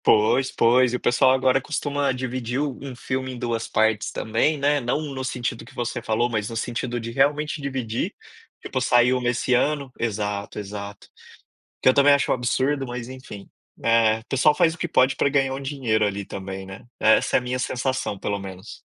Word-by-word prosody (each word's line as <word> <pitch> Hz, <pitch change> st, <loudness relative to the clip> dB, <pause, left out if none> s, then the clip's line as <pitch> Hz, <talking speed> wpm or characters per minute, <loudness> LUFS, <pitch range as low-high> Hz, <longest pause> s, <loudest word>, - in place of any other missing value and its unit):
Pois, 120 Hz, +5 st, +3 dB
pois, 125 Hz, +1 st, +3 dB
e -, -, +1 dB
o -, -, -2 dB
pessoal 125 Hz, +2 st, +3 dB
agora 130 Hz, 0 st, +3 dB
costuma 145 Hz, 0 st, -1 dB
dividir 125 Hz, -1 st, -3 dB
um 145 Hz, -3 st, -2 dB
um 135 Hz, -2 st, -7 dB
filme 130 Hz, +1 st, -3 dB
em -, -, -8 dB
2 115 Hz, -2 st, -2 dB
partes 110 Hz, 0 st, +1 dB
também, 115 Hz, +8 st, 0 dB
né, 145 Hz, +1 st, +2 dB
não 120 Hz, +4 st, 0 dB
no 130 Hz, 0 st, -4 dB
sentido 120 Hz, -3 st, -3 dB
que 115 Hz, -, -16 dB
você 120 Hz, 0 st, -3 dB
falou 110 Hz, +1 st, +1 dB
mas 110 Hz, -2 st, -2 dB
no 115 Hz, -, -5 dB
sentido 120 Hz, +1 st, -3 dB
de 115 Hz, 0 st, -6 dB
realmente 150 Hz, +4 st, +1 dB
dividir, 130 Hz, -5 st, -3 dB, 0.4 s
tipo -, -, -3 dB
saiu 125 Hz, +1 st, +3 dB
nesse 125 Hz, +1 st, 0 dB
ano 140 Hz, +1 st, +1 dB
exato, 105 Hz, -3 st, -3 dB
exato. 100 Hz, 0 st, -7 dB, 0.7 s
Que -, -, +1 dB
eu 130 Hz, -, +7 dB
também 140 Hz, +1 st, +6 dB
acho 140 Hz, -, +2 dB
um -, -, +5 dB
absurdo, 130 Hz, +3 st, 0 dB
mas 120 Hz, -1 st, -6 dB
enfim, 130 Hz, -6 st, -10 dB, 0.3 s
é 115 Hz, -1 st, +3 dB
pessoal 135 Hz, +3 st, +3 dB
faz 165 Hz, +1 st, +3 dB
o -, -, -11 dB
que 175 Hz, -, -3 dB
pode 130 Hz, -1 st, +3 dB
para -, -, +2 dB
ganhar 135 Hz, -1 st, +1 dB
um 135 Hz, -, -5 dB
dinheiro 130 Hz, -6 st, 0 dB
ali 100 Hz, -1 st, -3 dB
também, 95 Hz, 0 st, -6 dB
né. 95 Hz, 0 st, -10 dB, 0.2 s
Essa 110 Hz, 0 st, +4 dB
é -, -, +3 dB
a -, -, -9 dB
minha 125 Hz, +1 st, -2 dB
sensação 130 Hz, -4 st, -2 dB
pelo 100 Hz, +1 st, -2 dB
menos. 95 Hz, +1 st, -9 dB
125 Hz, 195 wpm, -24 LUFS, 110-135 Hz, 0.7 s, eu